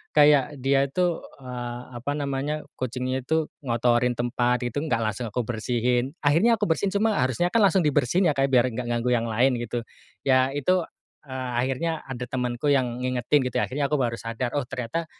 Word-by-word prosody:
kayak 145 -1 +5
dia 135 +1 +3
itu, 175 +2 0 0.2
eee, 120 -1 -5 0.2
apa 145 +3 -2
namanya, 145 +2 -2 0.2
kucingnya 130 +1 -2
itu 160 +4 0 0.2
ngotorin 120 +1 +2
tempat 120 0 +1
itu 120 +4 -2
enggak 115 -8 0
langsung 110 +2 -3
aku 120 +2 -2
bersihin. 120 +5 -1
Akhirnya 195 +11 +4
aku 210 - 0
bersihin 180 +4 +1
cuma 220 +2 +2
harusnya 130 +8 0
kan 230 - +4
langsung 190 -4 +4
dibersihin 150 +6 +2
ya 155 - +3
Kak, 135 0 +1
biar 125 -2 +4
enggak 120 0 -4
ganggu 120 +1 +1
yang 115 -1 0
lain 125 +4 +3
gitu, 120 0 -4 0.4
ya 130 -1 +4
itu, 160 +7 +1 0.5
eee, 130 -1 -4
akhirnya 150 +5 -1
ada 125 -1 -4
temenku 125 +3 -1
yang 125 -3 0
ngingetin 130 +2 +1
gitu - - +1
akhirnya 140 +2 -1
aku 145 -1 +1
baru 115 -1 -1
sadar, 120 +4 -3
oh 135 - -1
ternyata 125 +8 -3
130 Hz, 180 wpm, -25 LUFS, 120-150 Hz, 0.5 s, kayak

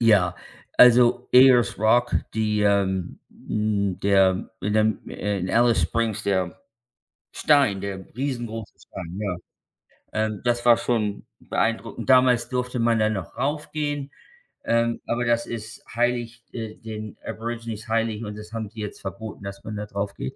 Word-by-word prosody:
Ja, 100 -6 +4 0.4
also 125 -1 +6
Ayers 125 -4 +6
Rock, 120 +3 +3 0.2
die, 105 -1 +1
ähm 95 -3 +1 0.3
hm, 100 -3 0
der 95 -2 +3
in 105 +3 -1
dem 110 0 +2
in 100 -2 -2
Alice 120 -5 +4
Springs 110 +5 -1
der 95 -4 -1 0.7
Stein 135 -10 +3
der 95 -1 -5
riesengroße 120 -5 -4
Stein, 90 -1 -8
ja. 100 -4 -2 0.8
Ähm, 110 -2 -1
das 120 -1 +1
war 120 -1 +8
schon 105 -4 -1 0.2
beeindruckend. 115 0 -2
Damals 125 -2 +5
durfte 125 0 -2
man 115 -1 +2
da 110 - +3
noch 95 -5 -5
raufgehen, 145 0 -2 0.6
ähm, 115 0 +1
aber 120 +1 0
das 120 0 +1
ist 110 -1 -7
heilig 120 -1 -1
äh, 110 -2 -5
den 110 -1 -8
Aborigines 115 -1 -5
heilig 115 0 0
und 105 0 -6
das 105 +1 -11
haben 110 -2 -4
die 110 0 -9
jetzt 105 - -6
verboten, 105 +1 -7
dass 100 0 -7
man 110 - -6
da 105 0 -4
draufgeht. 100 0 -4
110 Hz, 145 wpm, -24 LUFS, 100-120 Hz, 0.8 s, war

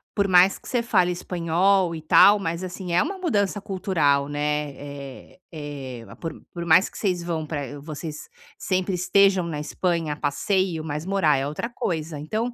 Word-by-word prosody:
por 200 -1 +2
mais 185 +1 +5
que - - -15
você 245 -2 0
fale 185 -7 +2
espanhol 175 +1 +1
e 160 - -7
tal, 200 +6 +7
mas 170 -2 -3
assim, 180 0 -6
é 175 - +4
uma 390 - -4
mudança 205 - 0
cultural, 165 -8 +1
né, 150 0 -1
eh 140 +2 -10
eh, 140 -6 -7 0.2
por 165 -2 -4 0.2
por 170 -1 -5
mais 170 +3 +5
que - - -12
vocês 180 -4 -1
vão 165 -2 -3
para 145 -2 -5
vocês 155 +1 -7 0.3
sempre 185 0 -1
estejam 195 +1 +3
na 155 -3 -4
Espanha 165 0 -1
a - - -10
passeio, 175 +3 0
mas 150 0 -4
morar 185 -7 +2
é 135 +1 -1
outra 155 +11 -4
coisa. 160 -9 -3
Então 220 +11 -2
170 Hz, 175 wpm, -24 LUFS, 150-190 Hz, 0.3 s, tal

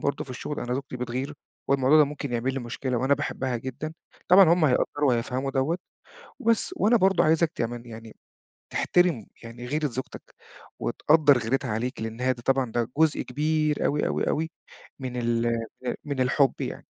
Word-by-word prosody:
برضه 140 - -1
في 135 - -12
الشُغل، 145 +4 -5
أنا 125 +1 -2
زوجتي 135 -1 -5
بتغِير 125 +4 -4 0.3
والموضوع 140 +2 +4
ده 150 - +7
ممكن 145 -2 -5
يعمل 120 +3 -1
لي 135 - -2
مشكلة 125 +1 -3
وأنا 135 +3 +3
باحبها 130 -3 -2
جدًا. 130 +6 -6 0.4
طبعًا 190 +2 +9
هم 170 -2 +3
هيقدّروا 145 +1 +2
وهيفهموا 125 +3 0
دوّة 135 +6 0 0.6
وبس. 230 +8 +1
وأنا 230 +4 +4
برضه 190 -3 +3
عايزك 160 +1 +3
كمان 120 +1 -3
يعني 115 -1 -10 0.6
تحترم 175 - +2 0.2
يعني 115 +1 -9
غيرة 150 +4 0
زوجتك 130 0 -7 0.4
وتقدَّر 150 -3 +4
غيرتها 125 +2 -1
عليك، 120 +4 -3
لإن 115 +2 -5
هي 130 0 +2
دي 120 -1 -10
طبعًا 135 -3 +1
ده 120 0 -1
جزء 160 -2 +3
كبير 155 0 0
أوي، 145 +1 +1
أوي، - - -1
أوي 160 +1 -1 0.5
من 130 -2 -5
ال 120 -1 0
ال 115 +2 -3
من 140 -3 -3
الحُب 130 +1 +3
يعني. - - -5
130 Hz, 175 wpm, -26 LUFS, 120-150 Hz, 0.6 s, طبعًا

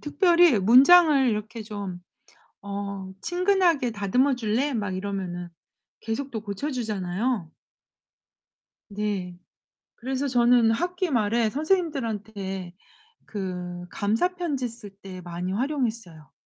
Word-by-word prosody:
특별히 340 - +4
문장을 275 - +7
이렇게 220 +1 -3
좀 200 -4 -6 0.7
어 200 -1 -5
"친근하게 355 - +2
다듬어 245 +6 +1
줄래?" 245 +5 0
막 205 -6 -2
이러면은 185 -3 -4 0.5
계속 250 +5 -4
또 225 - -4
고쳐 210 +8 -4
주잖아요. 215 - -2 1.4
네. 200 -4 -3 0.6
그래서 265 +3 -3
저는 240 -2 +4
학기 355 +8 -1
말에 225 -1 +2
선생님들한테 220 - -2 0.5
그 180 -3 -5
감사 225 - 0
편지 290 -8 -2
쓸 230 -2 -11
때 185 -2 -9
많이 175 +1 -5
활용했어요. 225 - -3
225 Hz, 235 characters per minute, -25 LUFS, 195-275 Hz, 1.4 s, 문장을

